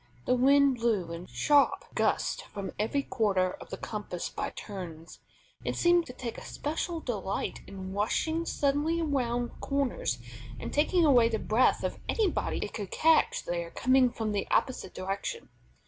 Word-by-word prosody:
The 250 Hz, -, +3 dB
wind 275 Hz, +1 st, +5 dB
blew 215 Hz, -8 st, 0 dB
in 170 Hz, +2 st, -7 dB
sharp 280 Hz, -, +3 dB
gusts -, -, +1 dB
from 200 Hz, -2 st, -6 dB
every 250 Hz, +7 st, 0 dB
quarter 195 Hz, -8 st, +1 dB
of -, -, -10 dB
the -, -, -5 dB
compass 205 Hz, -5 st, -5 dB
by -, -, -3 dB
turns. 175 Hz, -5 st, -8 dB, 0.4 s
It -, -, -2 dB
seemed 345 Hz, -1 st, +4 dB
to 250 Hz, -, -8 dB
take 240 Hz, -3 st, -6 dB
especial 325 Hz, +3 st, -3 dB
delight 200 Hz, -7 st, -3 dB
in 190 Hz, -1 st, -7 dB
rushing 315 Hz, +11 st, 0 dB
suddenly 295 Hz, +4 st, +1 dB
around 245 Hz, -6 st, 0 dB
corners 275 Hz, -, -1 dB, 0.4 s
and -, -, -5 dB
taking 320 Hz, +4 st, +3 dB
away 245 Hz, -6 st, +6 dB
the 225 Hz, -, 0 dB
breath 220 Hz, +4 st, +2 dB
of -, -, -2 dB
anybody 425 Hz, -6 st, +1 dB
it -, -, -9 dB
could 205 Hz, -4 st, -5 dB
catch 320 Hz, 0 st, +3 dB
there 170 Hz, -1 st, -2 dB
coming 255 Hz, +5 st, +3 dB
from 225 Hz, -3 st, -3 dB
the 205 Hz, -1 st, -1 dB
opposite 260 Hz, -7 st, 0 dB
direction. 195 Hz, -, -4 dB
240 Hz, 155 wpm, -29 LUFS, 195-285 Hz, 0.4 s, away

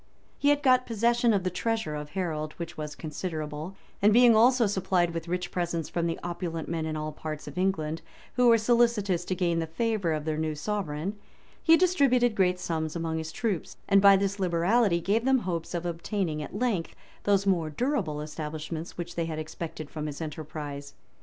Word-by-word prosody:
He 285 Hz, -, +3 dB
had 290 Hz, 0 st, +3 dB
got 255 Hz, -2 st, +4 dB
possession 235 Hz, +1 st, +2 dB
of 200 Hz, -4 st, +1 dB
the 185 Hz, -, -1 dB
treasure 220 Hz, -4 st, -1 dB
of 150 Hz, 0 st, -5 dB
Harold, 155 Hz, -4 st, -2 dB
which 170 Hz, -1 st, -7 dB
was 150 Hz, -1 st, -5 dB
considerable; 155 Hz, +1 st, -5 dB, 0.3 s
and 205 Hz, +2 st, +6 dB
being 240 Hz, +1 st, +7 dB
also 240 Hz, +2 st, +5 dB
supplied 185 Hz, -3 st, +1 dB
with 165 Hz, 0 st, -4 dB
rich 180 Hz, +1 st, -2 dB
presents 170 Hz, -3 st, -2 dB
from 170 Hz, -1 st, -1 dB
the 165 Hz, -, -2 dB
opulent 170 Hz, -2 st, -4 dB
men 160 Hz, -1 st, -2 dB
in 155 Hz, -1 st, -3 dB
all 155 Hz, 0 st, -3 dB
parts 155 Hz, 0 st, -6 dB
of 145 Hz, -, -8 dB
England, 165 Hz, -4 st, -1 dB, 0.3 s
who 250 Hz, 0 st, +4 dB
were 230 Hz, -1 st, +7 dB
solicitous 225 Hz, -6 st, +2 dB
to 185 Hz, -, -1 dB
gain 170 Hz, -2 st, +1 dB
the 165 Hz, -, -2 dB
favor 200 Hz, 0 st, 0 dB
of 155 Hz, -1 st, -3 dB
their 155 Hz, -1 st, -1 dB
new 155 Hz, -1 st, -1 dB
sovereign, 190 Hz, +1 st, -3 dB, 0.4 s
he 330 Hz, 0 st, +6 dB
distributed 275 Hz, -10 st, +3 dB
great 185 Hz, -3 st, +2 dB
sums 160 Hz, -3 st, -3 dB
among 165 Hz, -1 st, -2 dB
his 160 Hz, 0 st, -5 dB
troops, 205 Hz, -6 st, -3 dB
and 200 Hz, -1 st, +5 dB
by 200 Hz, 0 st, +8 dB
this 200 Hz, +1 st, -1 dB
liberality 180 Hz, +2 st, +2 dB
gave 200 Hz, +7 st, +1 dB
them 265 Hz, +1 st, +4 dB
hopes 175 Hz, -6 st, -3 dB
of 175 Hz, 0 st, -3 dB
obtaining 170 Hz, -1 st, -2 dB
at 150 Hz, -, -6 dB
length 220 Hz, -9 st, -1 dB, 0.3 s
those 200 Hz, -1 st, +3 dB
more 175 Hz, -5 st, +2 dB
durable 195 Hz, -, -1 dB
establishments 155 Hz, +2 st, -6 dB
which 175 Hz, -, -5 dB
they 170 Hz, -, -1 dB
had 160 Hz, -1 st, -4 dB
expected 155 Hz, 0 st, -6 dB
from 155 Hz, 0 st, -5 dB
his 145 Hz, -1 st, -6 dB
enterprise. 150 Hz, -2 st, -6 dB
175 Hz, 190 wpm, -28 LUFS, 155-210 Hz, 0.4 s, by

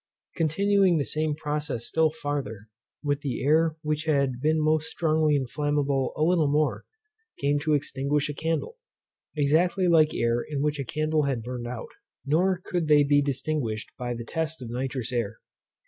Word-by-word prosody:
Continuing 190 Hz, +2 st, +3 dB
the 145 Hz, -, 0 dB
same 155 Hz, -1 st, -1 dB
process 150 Hz, -5 st, -3 dB
still 160 Hz, -1 st, +2 dB
farther, 145 Hz, -8 st, -4 dB, 0.4 s
the 145 Hz, -3 st, -2 dB
air 160 Hz, +2 st, +3 dB
which 150 Hz, +1 st, -1 dB
had 140 Hz, -5 st, +1 dB
been 155 Hz, +2 st, +2 dB
most 155 Hz, +1 st, +1 dB
strongly 155 Hz, -2 st, +2 dB
inflammable 140 Hz, 0 st, 0 dB
a 155 Hz, -, 0 dB
little 165 Hz, -2 st, +3 dB
before, 150 Hz, +1 st, 0 dB, 0.5 s
came 145 Hz, +1 st, +1 dB
to 150 Hz, +1 st, +1 dB
extinguish 140 Hz, +1 st, -1 dB
a 150 Hz, -, -4 dB
candle, 165 Hz, -, -3 dB, 0.6 s
exactly 170 Hz, +6 st, +2 dB
like 160 Hz, -3 st, +4 dB
air 115 Hz, +1 st, +1 dB
in 145 Hz, 0 st, -3 dB
which 150 Hz, -1 st, 0 dB
a -, -, -1 dB
candle 155 Hz, +2 st, 0 dB
had 130 Hz, -5 st, -1 dB
burned 120 Hz, 0 st, -5 dB
out, 120 Hz, -1 st, -6 dB, 0.4 s
nor 180 Hz, +6 st, +2 dB
could 175 Hz, -3 st, -2 dB
they 150 Hz, -1 st, +6 dB
be 145 Hz, 0 st, +4 dB
distinguished 135 Hz, -5 st, -2 dB
by 120 Hz, -1 st, -4 dB
the 115 Hz, 0 st, -6 dB
test 160 Hz, +2 st, -2 dB
of 120 Hz, -3 st, -7 dB
nitrous 130 Hz, -1 st, -3 dB
air. 115 Hz, -3 st, -2 dB
150 Hz, 165 wpm, -26 LUFS, 135-155 Hz, 0.6 s, they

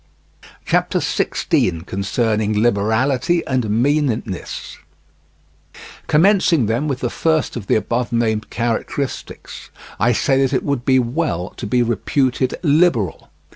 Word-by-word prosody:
CHAPTER -, -, +1 dB
XVI. 85 Hz, -1 st, 0 dB
CONCERNING 105 Hz, +2 st, -1 dB
LIBERALITY 120 Hz, +9 st, +1 dB
AND 125 Hz, -5 st, -1 dB
MEANNESS 120 Hz, -, -1 dB, 1.3 s
Commencing 170 Hz, -, +3 dB
then 115 Hz, +8 st, -1 dB
with 135 Hz, -3 st, -3 dB
the 120 Hz, -, -1 dB
first 160 Hz, -3 st, 0 dB
of 110 Hz, -5 st, -6 dB
the -, -, +2 dB
above 115 Hz, +3 st, -1 dB
named 110 Hz, -2 st, 0 dB
characteristics, 120 Hz, +3 st, -4 dB, 0.3 s
I 120 Hz, +2 st, +3 dB
say 135 Hz, +3 st, +2 dB
that 135 Hz, 0 st, +1 dB
it 130 Hz, -, +1 dB
would 140 Hz, -4 st, -2 dB
be 130 Hz, -1 st, +4 dB
well 120 Hz, -, -1 dB
to 115 Hz, -, -7 dB
be 120 Hz, +3 st, +2 dB
reputed 130 Hz, +3 st, 0 dB
liberal. 145 Hz, -, +1 dB
120 Hz, 120 wpm, -19 LUFS, 110-140 Hz, 1.3 s, be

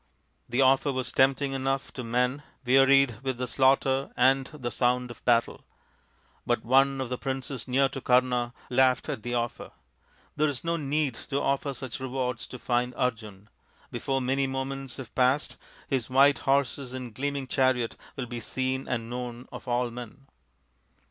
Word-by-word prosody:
The 120 Hz, +3 st, +1 dB
offer 135 Hz, +2 st, +4 dB
was 130 Hz, -1 st, -3 dB
tempting 135 Hz, +1 st, +2 dB
enough 135 Hz, 0 st, -2 dB
to 125 Hz, -, -5 dB
men 125 Hz, +4 st, 0 dB, 0.2 s
wearied 135 Hz, -2 st, +5 dB
with 130 Hz, -2 st, -2 dB
the 125 Hz, -, -2 dB
slaughter 135 Hz, +1 st, +2 dB
and 135 Hz, +1 st, +4 dB
the 130 Hz, -6 st, -6 dB
sound 125 Hz, 0 st, +1 dB
of -, -, -13 dB
battle. 120 Hz, -1 st, +2 dB, 0.8 s
But 120 Hz, -2 st, -1 dB
one 135 Hz, +2 st, +4 dB
of 130 Hz, -2 st, -3 dB
the 125 Hz, -, -3 dB
princes 135 Hz, -1 st, -4 dB
near 135 Hz, +2 st, +3 dB
to 135 Hz, -, -6 dB
Kama 125 Hz, -1 st, +2 dB, 0.2 s
laughed 130 Hz, +3 st, +3 dB
at 135 Hz, -7 st, -3 dB
the 120 Hz, +2 st, -3 dB
offer. 120 Hz, 0 st, -3 dB, 0.3 s
" -, -, -34 dB
There 150 Hz, +1 st, +2 dB
is 140 Hz, -4 st, -3 dB
no 170 Hz, 0 st, 0 dB
need 150 Hz, -2 st, 0 dB, 0.2 s
to 140 Hz, -, 0 dB
offer 140 Hz, +1 st, 0 dB
rich 130 Hz, -1 st, -6 dB
rewards 125 Hz, -2 st, -3 dB
to 125 Hz, -, -8 dB
find 125 Hz, 0 st, -1 dB
out -, -, -13 dB
Arjun. 105 Hz, -3 st, -13 dB, 0.4 s
Before 135 Hz, -1 st, -1 dB
many 135 Hz, +2 st, +1 dB
moments 135 Hz, 0 st, -4 dB
have 130 Hz, -4 st, -9 dB
passed 130 Hz, +3 st, +1 dB, 0.3 s
his 130 Hz, -4 st, -1 dB
white 140 Hz, +2 st, +5 dB
horses 135 Hz, -1 st, +1 dB
and 125 Hz, -3 st, -6 dB
gleaming 140 Hz, +2 st, -2 dB
chariot 130 Hz, -3 st, +1 dB, 0.2 s
will 130 Hz, -, -3 dB
be 120 Hz, 0 st, -6 dB
seen 130 Hz, +3 st, -2 dB
and 115 Hz, -2 st, -2 dB
known 125 Hz, 0 st, -6 dB
of -, -, -9 dB
all 120 Hz, 0 st, 0 dB
men. 125 Hz, +3 st, -9 dB
130 Hz, 170 wpm, -27 LUFS, 125-135 Hz, 0.8 s, wearied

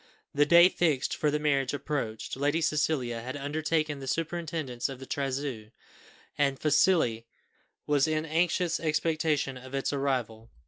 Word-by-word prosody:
The 145 Hz, +1 st, +3 dB
day 170 Hz, +2 st, +8 dB
fixed 155 Hz, -8 st, 0 dB
for 150 Hz, -, +1 dB
the 150 Hz, -, +1 dB
marriage 140 Hz, -3 st, 0 dB
approached; 135 Hz, -6 st, -4 dB
Lady 145 Hz, +4 st, +1 dB
Cecilia 150 Hz, -7 st, 0 dB
had 130 Hz, +4 st, -5 dB
undertaken 155 Hz, +1 st, -1 dB
the 135 Hz, -, -8 dB
superintendence 160 Hz, -5 st, -2 dB
of 135 Hz, -, -7 dB
the 135 Hz, -, -10 dB
trousseau, 135 Hz, -4 st, -3 dB, 0.7 s
and 140 Hz, -1 st, +2 dB
Felicie 145 Hz, -6 st, +2 dB, 0.6 s
was 145 Hz, 0 st, +2 dB
in 155 Hz, 0 st, -1 dB
anxious 170 Hz, +1 st, +1 dB
expectation 155 Hz, -3 st, 0 dB
of 130 Hz, +1 st, -9 dB
its 135 Hz, +1 st, -1 dB
arrival. 125 Hz, -5 st, -2 dB
145 Hz, 140 wpm, -28 LUFS, 135-155 Hz, 0.7 s, day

